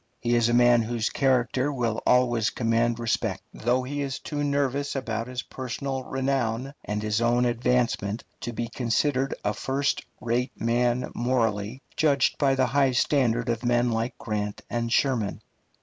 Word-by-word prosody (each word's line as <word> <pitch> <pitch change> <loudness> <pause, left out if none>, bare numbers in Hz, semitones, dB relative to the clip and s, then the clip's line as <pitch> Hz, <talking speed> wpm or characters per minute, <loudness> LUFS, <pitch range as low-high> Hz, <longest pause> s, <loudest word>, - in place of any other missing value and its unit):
He 120 - 0
is 120 0 +3
a - - +1
man 120 -1 +6
whose 115 0 -1
character 130 +1 +1
will 120 -5 -1
always 120 -3 +3
command 115 0 +1
respect, 110 -5 -1
though 125 +3 0
he 145 +3 -3
is 135 -1 -2
too 145 +2 -5
anxious 140 -1 0
about 115 -4 -2
his 125 0 -4
personal 130 +1 -4
renown 130 -1 -1
and 105 +1 -3
his 110 +1 0
own 120 +1 +3
advancement 120 -3 0 0.2
to 120 - -4
be 120 0 -3
considered 130 +3 0
a 105 - +1
first 135 +5 -1 0.2
rate 120 +2 -2
man 120 +2 +1
morally, 115 -1 -1
judged 140 -4 +2
by 135 -2 +3
the 130 -1 +3
high 135 +1 +2
standard 120 -3 +2
of 115 -1 -1
men 120 0 +2
like 115 +2 -2
Grant 105 -2 -3
and 115 -1 -1
Sherman. 120 -7 +1
120 Hz, 160 wpm, -26 LUFS, 115-130 Hz, 0.2 s, man